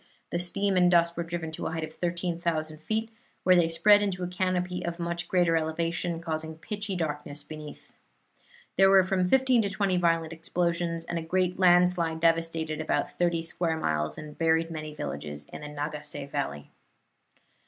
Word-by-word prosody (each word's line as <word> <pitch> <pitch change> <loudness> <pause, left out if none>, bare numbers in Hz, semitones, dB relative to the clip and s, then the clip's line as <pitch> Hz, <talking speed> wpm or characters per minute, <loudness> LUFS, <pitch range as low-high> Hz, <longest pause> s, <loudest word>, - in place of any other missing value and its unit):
The 170 - 0
steam 195 +2 0
and 180 0 +5
dust 170 -1 +3
were 170 - -2
driven 165 -1 -4
to 160 - -4
a - - -3
height 165 -1 -2
of 155 0 -6
13,000 170 -3 -2
feet, 220 +5 -2 0.3
where 185 0 +6
they 175 -2 +4
spread 205 +6 +5
into 190 -3 -1
a - - -1
canopy 180 0 -1
of 170 0 -3
much 170 0 -3
greater 175 -3 +3
elevation, 165 +1 -1
causing 160 -1 -4
pitchy 205 +2 -3
darkness 150 -3 -3
beneath. 155 -1 -10 0.8
There 195 0 +6
were 195 -1 +7
from 185 -1 0
fifteen 260 -1 +4
to 200 - -1
twenty 195 -2 +1
violent 165 -2 +1
explosions, 170 0 -1
and 170 0 -2
a - - -4
great 180 +2 0
landslide 175 -2 +4
devastated 165 -1 +1
about 155 - 0
thirty 170 -2 0
square 165 0 -1
miles 75 - -1
and 150 -1 -9
buried 165 0 +2
many 155 -1 -6
villages 75 - -5
in - - -7
the 150 - -6
Nagase 150 -1 -5
Valley. 135 - -3
170 Hz, 175 wpm, -28 LUFS, 160-180 Hz, 0.8 s, were